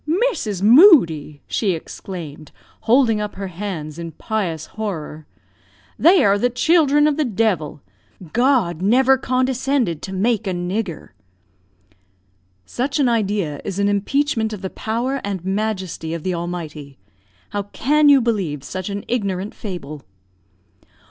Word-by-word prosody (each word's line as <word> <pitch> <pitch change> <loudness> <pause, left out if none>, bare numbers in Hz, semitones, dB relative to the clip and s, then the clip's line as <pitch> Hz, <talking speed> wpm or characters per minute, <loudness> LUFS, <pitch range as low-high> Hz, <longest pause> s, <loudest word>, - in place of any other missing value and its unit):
"Mrs. 210 - -4
Moodie!" 205 - +6
she 200 -5 0
exclaimed, 160 -2 -8 0.4
holding 230 -3 +4
up 210 -1 -5
her 195 -1 -5
hands 170 -4 -6
in 165 -1 -6
pious 175 -6 -3
horror; 160 -8 -6 0.7
"they 350 0 +6
are 200 0 +3
the 245 - +2
children 295 +3 +3
of 300 -1 +1
the 310 - +2
devil! 195 - -1 0.5
God 240 - +2
never 260 +7 +4
condescended 255 - 0
to 190 - -6
make 215 +3 0
a 190 - -1
nigger." 175 0 -4 1.6
"Such 270 - -2
an 265 -4 +3
idea 200 -10 -1
is 195 -2 -5
an 200 0 +2
impeachment 220 +2 0
of 200 - -8
the 190 - -4
power 245 +5 -2
and 195 -3 -4
majesty 190 -5 -3
of 165 - -7
the 185 - -1
Almighty. 160 -5 -6 0.5
How 205 - -1
can 290 +9 +2
you 280 -2 +6
believe 190 - -1
such 185 +4 -5
an 200 0 -5
ignorant 200 -4 -2
fable?" 155 -8 -7
205 Hz, 135 wpm, -20 LUFS, 175-245 Hz, 1.6 s, Moodie